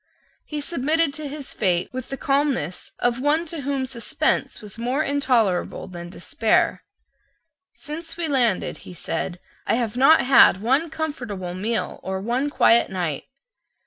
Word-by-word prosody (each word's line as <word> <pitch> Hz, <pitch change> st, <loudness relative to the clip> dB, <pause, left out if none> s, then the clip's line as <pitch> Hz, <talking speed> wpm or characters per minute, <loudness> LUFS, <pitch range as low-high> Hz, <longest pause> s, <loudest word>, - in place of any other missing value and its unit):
He 300 Hz, -1 st, -4 dB
submitted 310 Hz, 0 st, +1 dB
to 305 Hz, -1 st, -5 dB
his 285 Hz, -1 st, -7 dB
fate 180 Hz, -3 st, +1 dB
with 255 Hz, -1 st, -5 dB
the 270 Hz, -, -4 dB
calmness 275 Hz, -, -1 dB
of 245 Hz, +1 st, 0 dB
one 305 Hz, +4 st, +2 dB
to 325 Hz, -2 st, -6 dB
whom 275 Hz, -1 st, -1 dB
suspense 245 Hz, -3 st, -1 dB
was 210 Hz, +1 st, -10 dB
more 255 Hz, +6 st, 0 dB
intolerable 245 Hz, -, +1 dB
than 175 Hz, -2 st, -8 dB
despair. 215 Hz, +5 st, 0 dB, 0.9 s
"Since 325 Hz, +2 st, -7 dB
we 340 Hz, -2 st, 0 dB
landed," 245 Hz, -9 st, +1 dB
he 180 Hz, -, -12 dB
said, 175 Hz, +2 st, -3 dB, 0.3 s
"I -, -, +3 dB
have 235 Hz, -3 st, -1 dB
not 275 Hz, +6 st, +6 dB
had 250 Hz, -7 st, +6 dB
one 265 Hz, +10 st, +1 dB
comfortable 245 Hz, -, -4 dB
meal 210 Hz, +5 st, -2 dB
or 190 Hz, 0 st, -3 dB
one 245 Hz, +8 st, -1 dB
quiet 235 Hz, -4 st, +4 dB
night." 175 Hz, -6 st, -3 dB
255 Hz, 145 wpm, -23 LUFS, 200-290 Hz, 0.9 s, not